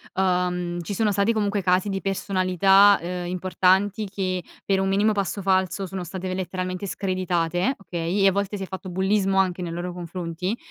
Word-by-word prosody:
Uhm, 180 -2 0
ci 200 +4 -5
sono 215 0 +2
stati 200 +3 +2
comunque 205 -2 0
casi 185 +2 +2
di 195 -1 -2
personalità, 195 +1 +4
uhm, 175 +1 -4
importanti 190 +3 +1
che 185 -3 -2 0.2
per 195 -1 +2
un 195 - +1
minimo 205 +3 +3
passo 200 -1 -2
falso 190 0 +1
sono 185 0 -5
state 185 +1 -5
letteralmente 185 +1 -3
screditate, 180 +2 -1
okay, 180 0 -2
e - - +7
a 195 - +5
volte 200 +1 -2
si 195 - -5
è - - -3
fatto 185 0 -7
bullismo 190 +1 +1
anche 185 -1 +1
nei 170 -2 -4
loro 175 +1 -4
confronti. 175 +3 -4
190 Hz, 180 wpm, -24 LUFS, 180-195 Hz, 0.2 s, e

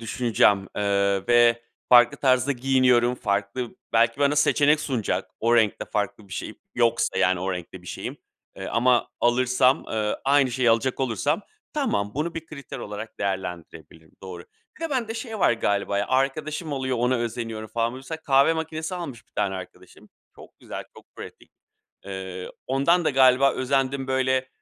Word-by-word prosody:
düşüneceğim, 110 -4 +2
eee, 100 -1 +1
ve 120 -1 +4 0.3
farklı 120 -1 +6
tarzda 130 0 +2
giyiniyorum. 125 -2 +3
Farklı 105 +2 -2 0.2
belki 115 +3 +2
bana 145 +1 +3
seçenek 150 +1 +3
sunacak 115 -10 -2
o 120 +1 +3
renkte 110 -3 +2
farklı 105 0 -3
bir - - -12
şey - - -5 0.2
yoksa, 120 -2 +1
yani, 90 0 +2
o 95 +1 -2
renkte 90 -2 -7
bir - - -17
şeyim, - - -6 0.4
eee, 95 - -6
ama 120 +1 +2
alırsam, 125 +2 +3
eee, 105 -1 -1
aynı 140 -1 +3
şeyi 125 -1 +2
alacak 115 +4 +1
olursam 135 - 0 0.3
tamam, 105 - -1
bunu 155 +4 -2
bir 165 -1 -6
kriter 140 -4 -9
olarak 105 +2 -8
değerlendirebilirim. 85 -5 -6
Doğru. 90 -2 -8 0.3
Bir 330 - -4
de 325 - -3
bende 235 -5 -2
şey 225 -1 -6
var - - +4
galiba 100 -3 0
ya, - - -1
arkadaşım 150 +4 -1
oluyor, 130 -2 -2
ona 125 +2 +2
özeniyorum 115 -2 -4
falan. 115 +1 -1
Mesela 135 +5 -7
kahve 140 +2 +4
makinesi 160 +1 -4
almış 140 -10 -7
bir - - -39
tane 100 -2 -1
arkadaşım. 95 -1 -11 0.3
Çok - - -16
güzel, - - -7
çok - - -15
pratik. - - -11 0.5
Eee, 95 -1 -6 0.2
ondan 140 +7 +2
da - - +2
galiba 130 0 +5
özendim 135 +1 -1
böyle, 130 0 0
125 Hz, 160 wpm, -24 LUFS, 105-135 Hz, 0.5 s, farklı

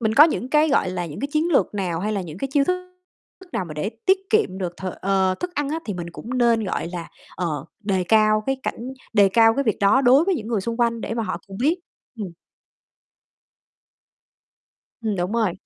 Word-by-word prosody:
mình 220 -1 +1
có 295 - +9
những 285 -5 -1
cái, 305 +1 +4
gọi 275 -9 +2
là, 180 -1 -3
những 150 -2 -8
cái 280 - -2
chiến 320 +3 +1
lược 275 - +2
nào, 180 -5 -2
hay 215 +3 -1
là 200 - -1
những 170 -1 -8
cái 270 - -2
chiêu 280 -1 +4
thức 365 +2 -2 0.5
thức 380 -2 -17
nào 185 - -1
mà 155 - -8
để 150 +8 -2 0.2
tiết 380 0 +6
kiệm 190 - +2
được 175 -2 -4
th 190 - -6
ờ, 190 -1 +2
thức 360 0 -4
ăn 290 -2 -1
á 315 +3 -1
thì 205 - -3
mình 170 -1 -6
cũng 240 +8 -5
nên, 235 -2 +3
gọi 185 - -2
là, 175 -1 -6 0.3
ờ, 155 -6 -2 0.2
đề 195 -3 0
cao 215 +2 +4
cái 270 - +1
cảnh - - -3 0.3
đề 205 -3 +5
cao 225 +2 +5
cái 280 - 0
việc 220 -5 +1
đó 205 +6 +5
đối 270 +4 +5
với 385 +1 +2
những 220 -10 -5
người 225 -4 0
xung 230 +4 -3
quanh 230 -1 +1
để 225 - -3
mà 230 - -1
họ 215 - -3
cùng 195 -1 -9
biết. 305 +7 +3 0.4
Ừm. 205 -3 -3 2.7
Ừm, 215 -3 -1
đúng 180 +2 -2
rồi. 225 -6 +1
220 Hz, 230 wpm, -23 LUFS, 190-270 Hz, 2.7 s, có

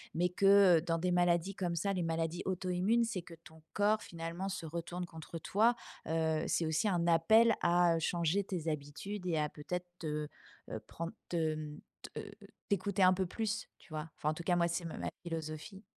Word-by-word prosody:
mais 180 +2 +2
que 195 -1 +6
dans 165 0 0
des 180 +2 0
maladies 175 +1 +2
comme 175 -3 -1
ça, 195 +4 0
les 180 -2 -1
maladies 165 +1 -1
auto-immunes, 185 +5 +1
c'est 225 -5 -3
que 170 - -11
ton 160 0 -14
corps 210 +1 +3
finalement 170 +3 -4
se 180 - -4
retourne 170 +2 -4
contre 165 0 -8
toi, 220 +8 +3 0.3
heu, 160 -1 +1
c'est 170 - +1
aussi 160 +6 +1
un 175 -3 +1
appel 220 +8 +6
à 175 -1 +4
changer 170 +4 +1
tes 170 -4 -2
habitudes 155 +7 -5
et 165 -3 +1
à 150 -1 +1
peut-être 180 +5 -5
te, 150 -2 -2 0.4
heu, 110 - -3
prendre 170 +1 -5 0.2
te, 175 - -1
hem, 155 -2 -2 0.3
te - - -6 0.4
t'écouter 200 0 +1
un 185 0 +7
peu 190 +1 0
plus 225 +3 -2
tu 155 - -15
vois? 155 +1 -4
Enfin 150 - 0
en - - +1
tout 170 - -6
cas 175 +1 +2
moi 170 0 +3
c'est 170 +1 -2
ma 165 - -5
ma - - -2
philosophie. 165 +3 -5
170 Hz, 195 wpm, -34 LUFS, 160-190 Hz, 0.4 s, un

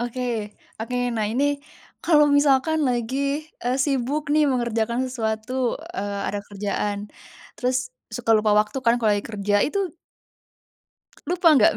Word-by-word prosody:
Oke, 240 -3 -3 0.3
oke, 250 +2 -3 0.2
nah 220 - 0
ini 255 +5 +1 0.6
kalau 300 -3 +5
misalkan 285 +2 +3
lagi, 240 +1 -1 0.5
eee, 245 +1 0
sibuk 275 +1 0
nih 305 - +5
mengerjakan 235 -2 0
sesuatu, 245 +1 -2 0.2
eee, 200 0 -3
ada 205 - -2
kerjaan 205 0 -2 0.6
terus 250 0 0 0.3
suka 225 +1 -3
lupa 215 0 +3
waktu 215 +6 0
kan 235 -2 +4
kalau 220 -3 +2
lagi 205 - -2
kerja, 205 -1 -1
itu 380 +1 -2 1.3
lupa 355 -1 +3
nggak 220 - +5
240 Hz, 135 wpm, -23 LUFS, 220-265 Hz, 1.3 s, kalau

